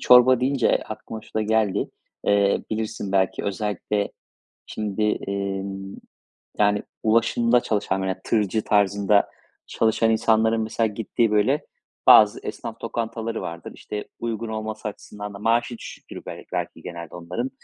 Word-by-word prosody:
çorba 125 Hz, 0 st, +7 dB
deyince 130 Hz, -1 st, +3 dB
aklıma 110 Hz, 0 st, -7 dB
şu -, -, -19 dB
da 110 Hz, -, +1 dB
geldi. 110 Hz, -2 st, +1 dB, 0.4 s
Eee, 100 Hz, -1 st, +3 dB
bilirsin 110 Hz, -2 st, -3 dB
belki 95 Hz, -1 st, +1 dB
özellikle 100 Hz, 0 st, -1 dB, 0.5 s
şimdi, 105 Hz, -1 st, -3 dB, 0.3 s
emm, 95 Hz, 0 st, -3 dB, 0.6 s
yani, 105 Hz, 0 st, +3 dB, 0.2 s
ulaşımda 115 Hz, +2 st, +3 dB
çalışan 100 Hz, -4 st, -1 dB
veya 95 Hz, -1 st, -2 dB
tırcı 110 Hz, -1 st, +1 dB
tarzında 100 Hz, 0 st, +3 dB, 0.4 s
çalışan 115 Hz, 0 st, +2 dB
insanların 110 Hz, 0 st, +3 dB
mesela 110 Hz, +1 st, 0 dB
gittiği, 110 Hz, +2 st, 0 dB
böyle, 105 Hz, +8 st, +2 dB, 0.4 s
bazı 105 Hz, -1 st, +8 dB
esnaf 115 Hz, -1 st, -6 dB
lokantaları 115 Hz, 0 st, -3 dB
vardır. 85 Hz, 0 st, -6 dB
İşte, 105 Hz, 0 st, -6 dB
uygun 115 Hz, -1 st, -3 dB
olması 110 Hz, -1 st, -4 dB
açısından 105 Hz, 0 st, -8 dB
da -, -, -7 dB
maaşı 115 Hz, +2 st, +1 dB
düşüktür -, -, -9 dB
bel -, -, -7 dB
belki -, -, -3 dB
genelde 85 Hz, -2 st, -8 dB
onların. 90 Hz, +10 st, -4 dB
110 Hz, 130 wpm, -24 LUFS, 100-115 Hz, 0.6 s, bazı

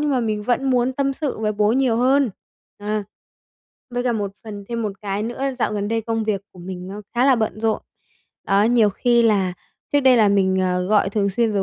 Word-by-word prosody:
nhưng 300 Hz, -1 st, 0 dB
mà 260 Hz, -, +1 dB
mình 215 Hz, -2 st, -2 dB
vẫn 250 Hz, +4 st, 0 dB
muốn 250 Hz, 0 st, +2 dB
tâm 275 Hz, +1 st, 0 dB
sự 290 Hz, -1 st, -4 dB
với 215 Hz, -1 st, 0 dB
bố 210 Hz, +1 st, +2 dB
nhiều 255 Hz, -3 st, +2 dB
hơn, 260 Hz, 0 st, +3 dB, 0.5 s
à. 210 Hz, 0 st, -2 dB, 0.9 s
Với 245 Hz, 0 st, -2 dB
cả 245 Hz, -, +1 dB
một 205 Hz, -3 st, -3 dB
phần 205 Hz, -2 st, -8 dB
thêm 235 Hz, -1 st, -3 dB
một 210 Hz, -2 st, -2 dB
cái 200 Hz, +1 st, -2 dB
nữa, 240 Hz, +3 st, -5 dB, 0.2 s
dạo 215 Hz, -, 0 dB
gần 205 Hz, 0 st, -2 dB
đây 225 Hz, +1 st, 0 dB
công 225 Hz, 0 st, -2 dB
việc 205 Hz, -2 st, -1 dB
của 180 Hz, -, -16 dB
mình 180 Hz, 0 st, -7 dB
nó 205 Hz, +2 st, -7 dB
khá 245 Hz, +2 st, +3 dB
là 270 Hz, -3 st, +5 dB
bận 220 Hz, -1 st, -2 dB
rộn. 225 Hz, -1 st, 0 dB, 0.6 s
Đó, 195 Hz, +1 st, +3 dB
nhiều 225 Hz, -2 st, +4 dB
khi 240 Hz, +3 st, +2 dB
là 200 Hz, -5 st, +2 dB, 0.4 s
trước 290 Hz, -, +4 dB
đây 260 Hz, -2 st, +5 dB
là 210 Hz, -2 st, +5 dB
mình, 190 Hz, -1 st, +2 dB
à, 180 Hz, 0 st, 0 dB
gọi 200 Hz, +1 st, +2 dB
thường 200 Hz, -2 st, 0 dB
xuyên 225 Hz, +2 st, +1 dB
với 200 Hz, -1 st, +1 dB
220 Hz, 230 wpm, -21 LUFS, 200-245 Hz, 0.9 s, là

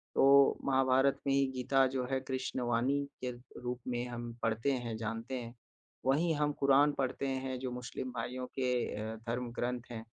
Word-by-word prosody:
तो 140 Hz, 0 st, +6 dB
महाभारत 135 Hz, 0 st, +3 dB
में 135 Hz, -, +3 dB
ही 135 Hz, 0 st, +4 dB
गीता 135 Hz, +1 st, +3 dB
जो 130 Hz, -1 st, 0 dB
है, 135 Hz, -, +2 dB
कृष्णवाणी 130 Hz, 0 st, 0 dB, 0.2 s
के 125 Hz, -, -1 dB, 0.3 s
रूप 125 Hz, 0 st, -3 dB
में 120 Hz, -1 st, -1 dB
हम 120 Hz, -1 st, -5 dB
पढ़ते 115 Hz, +4 st, +1 dB
हैं, 120 Hz, -4 st, -2 dB
जानते 115 Hz, +3 st, -4 dB
हैं। 115 Hz, 0 st, -8 dB, 0.5 s
वहीं 155 Hz, +6 st, +3 dB
हम 150 Hz, 0 st, +1 dB
कुरान 140 Hz, +1 st, +5 dB
पढ़ते 135 Hz, +1 st, -1 dB
हैं, 130 Hz, -1 st, -2 dB
जो 130 Hz, 0 st, -3 dB
मुस्लिम 125 Hz, +1 st, -5 dB
भाइयों 125 Hz, +1 st, -4 dB
के 125 Hz, -1 st, +2 dB, 0.2 s
अ, 110 Hz, +1 st, -4 dB
धर्म 120 Hz, +1 st, -2 dB
ग्रंथ 120 Hz, +1 st, -2 dB
हैं 115 Hz, -1 st, -6 dB
130 Hz, 170 wpm, -33 LUFS, 120-135 Hz, 0.5 s, तो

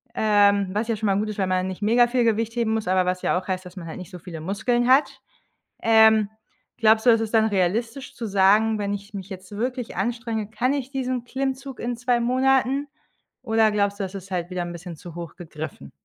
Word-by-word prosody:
ähm, 205 Hz, -2 st, +3 dB
was 215 Hz, +4 st, -1 dB
ja 230 Hz, -, 0 dB
schon 215 Hz, 0 st, -2 dB
mal 195 Hz, -, +2 dB
gut 215 Hz, +1 st, -1 dB
ist, 210 Hz, -, -6 dB
weil 190 Hz, -, +1 dB
man 185 Hz, 0 st, 0 dB
nicht 190 Hz, +1 st, -6 dB
mega 235 Hz, +4 st, +4 dB
viel 245 Hz, 0 st, +1 dB
Gewicht 225 Hz, 0 st, 0 dB
heben 230 Hz, -2 st, 0 dB
muss, 220 Hz, -4 st, -3 dB
aber 185 Hz, 0 st, +2 dB
was 180 Hz, 0 st, -1 dB
ja -, -, +2 dB
auch -, -, -14 dB
heißt, 185 Hz, -1 st, -3 dB
dass 180 Hz, +1 st, -11 dB
man 170 Hz, -3 st, -8 dB
halt 160 Hz, -, -7 dB
nicht 185 Hz, +1 st, -9 dB
so 180 Hz, -, -9 dB
viele 170 Hz, -2 st, -8 dB
Muskeln 220 Hz, +7 st, 0 dB
hat. 265 Hz, +3 st, +3 dB, 0.6 s
Ähm, 220 Hz, -2 st, +5 dB, 0.5 s
glaubst 220 Hz, 0 st, +4 dB
du, -, -, +8 dB
dass 225 Hz, -1 st, +4 dB
ist 220 Hz, -, -4 dB
dann 220 Hz, -1 st, +5 dB
realistisch 220 Hz, +6 st, -1 dB
zu 230 Hz, -, -5 dB
sagen, 210 Hz, +2 st, +3 dB
wenn 200 Hz, -1 st, -2 dB
ich 200 Hz, +1 st, -8 dB
mich 195 Hz, -1 st, -6 dB
jetzt 185 Hz, -1 st, -9 dB
wirklich 245 Hz, +2 st, -3 dB
anstrenge, 230 Hz, -3 st, -2 dB
kann 245 Hz, +5 st, 0 dB
ich 270 Hz, -2 st, -4 dB
diesen 255 Hz, -3 st, -2 dB
Klimmzug 270 Hz, +1 st, -4 dB
in 240 Hz, 0 st, -3 dB
2 245 Hz, 0 st, +1 dB
Monaten, 265 Hz, +3 st, +2 dB, 0.5 s
oder 225 Hz, -1 st, +3 dB
glaubst 200 Hz, -1 st, 0 dB
du, -, -, 0 dB
das 190 Hz, +1 st, -7 dB
ist 195 Hz, 0 st, -8 dB
halt 175 Hz, -1 st, -3 dB
wieder 180 Hz, -1 st, -2 dB
'n 175 Hz, -, -5 dB
bisschen 170 Hz, 0 st, -8 dB
zu 170 Hz, +2 st, -11 dB
hoch 170 Hz, -2 st, -8 dB
gegriffen? 155 Hz, -, -8 dB
215 Hz, 230 wpm, -24 LUFS, 185-240 Hz, 0.6 s, du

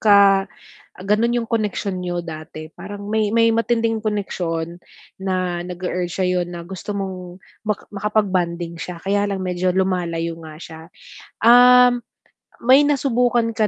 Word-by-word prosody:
ka, 200 Hz, -2 st, +6 dB, 0.6 s
ganun 220 Hz, +4 st, +2 dB
yung 230 Hz, -2 st, -1 dB
connection 205 Hz, -4 st, -2 dB
niyo 175 Hz, -1 st, -3 dB
dati. 155 Hz, -1 st, -8 dB
Parang 205 Hz, 0 st, -9 dB
may 220 Hz, -1 st, +2 dB
may 230 Hz, 0 st, +5 dB
matinding 230 Hz, -1 st, +1 dB
koneksyon 175 Hz, -5 st, -3 dB, 0.4 s
na 185 Hz, -2 st, -1 dB
nag-e-urge 180 Hz, 0 st, -4 dB
sa'yo 180 Hz, -1 st, +1 dB
na 175 Hz, -1 st, -7 dB
gusto 190 Hz, +2 st, -6 dB
mong 185 Hz, -2 st, -6 dB, 0.3 s
ma 210 Hz, -, +2 dB, 0.2 s
makapag-bonding 185 Hz, -5 st, -1 dB
siya, 175 Hz, -2 st, -6 dB
kaya 200 Hz, +1 st, +1 dB
lang 195 Hz, -1 st, -2 dB
medyo 180 Hz, 0 st, 0 dB
lumalayo 170 Hz, -3 st, -1 dB
nga 160 Hz, -1 st, -10 dB
siya. 160 Hz, -2 st, -10 dB, 0.6 s
Um, 245 Hz, 0 st, +7 dB, 0.6 s
may 270 Hz, +4 st, +6 dB
nasubukan 245 Hz, -4 st, +1 dB
ka 220 Hz, -1 st, +1 dB
195 Hz, 130 wpm, -21 LUFS, 175-225 Hz, 0.6 s, Um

